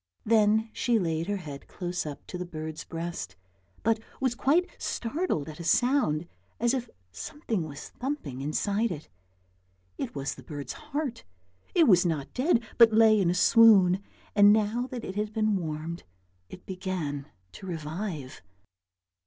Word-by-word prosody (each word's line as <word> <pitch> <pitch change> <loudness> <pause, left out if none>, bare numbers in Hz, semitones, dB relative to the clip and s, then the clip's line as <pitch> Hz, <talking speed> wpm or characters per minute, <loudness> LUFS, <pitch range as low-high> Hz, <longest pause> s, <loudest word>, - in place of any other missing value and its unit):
Then 220 0 +3
she 240 -2 +2
laid 165 -3 -1
her 205 0 0
head 145 -6 -8
close 175 -3 -4
up 145 - -7
to - - -8
the - - -2
bird's 155 -2 -6
breast, 165 - -5 0.5
but 225 0 +2 0.2
was 260 -2 +1
quite 295 +9 +2
startled 240 - -2
at 155 0 -9
a - - -5
sound, 175 - +2 0.3
as 235 +2 +2
if 245 -3 -2 0.2
something 185 - -4
was 145 -1 -9
thumping 245 - -4
inside 200 +10 0
it. 155 -2 -7 0.9
It - - -4
was 135 0 -2
the - - -12
bird's 145 -2 -6
heart. 295 -4 -4 0.5
It 330 -4 +6
was 180 -4 +6
not 160 -6 -2
dead 255 -2 +2 0.2
but 230 -1 +9
lay 220 -1 +6
in 175 - +2
a 175 - +1
swoon, 195 -2 +6 0.3
and 205 0 +8
now 220 +4 +1
that 250 -3 -6
it 190 - -5
had 210 +1 -2
been 215 -1 +2
warmed 165 -1 -4 0.5
it 185 - -11
began 180 -7 -4 0.2
to 190 - -10
revive. 160 -3 -5
195 Hz, 155 wpm, -28 LUFS, 160-230 Hz, 0.9 s, but